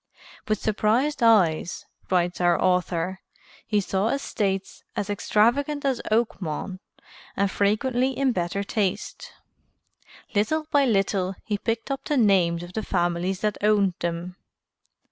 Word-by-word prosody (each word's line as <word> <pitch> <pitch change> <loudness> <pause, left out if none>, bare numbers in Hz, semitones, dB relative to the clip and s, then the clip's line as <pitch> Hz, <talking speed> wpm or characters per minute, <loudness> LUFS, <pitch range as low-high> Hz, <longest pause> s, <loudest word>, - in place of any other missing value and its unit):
"With 215 0 +1
surprised 225 +7 +1
eyes," 185 -8 +3 0.2
writes 180 -1 +1
our 175 -1 +3
author, 180 0 0 0.5
"he 210 -2 +2
saw 195 +1 0
estates 200 -7 -2
as 205 0 -2
extravagant 270 +9 +1
as 265 -3 0
Oakmont, 190 -5 -1 0.6
and 200 -1 +1
frequently 245 +6 +1
in 275 -1 +2
better 185 0 -2
taste. 200 -1 -2 1.0
Little 310 +10 +1
by 285 -1 +4
little 195 -4 +1
he 205 -2 -2
picked 230 +4 -2
up 270 - -3
the 295 - 0
names 180 -7 +3
of 175 +1 -10
the 220 - -2
families 175 0 -1
that 210 -1 -1
owned 205 -3 +3
them. 175 +2 -4
205 Hz, 125 wpm, -25 LUFS, 180-230 Hz, 1.0 s, by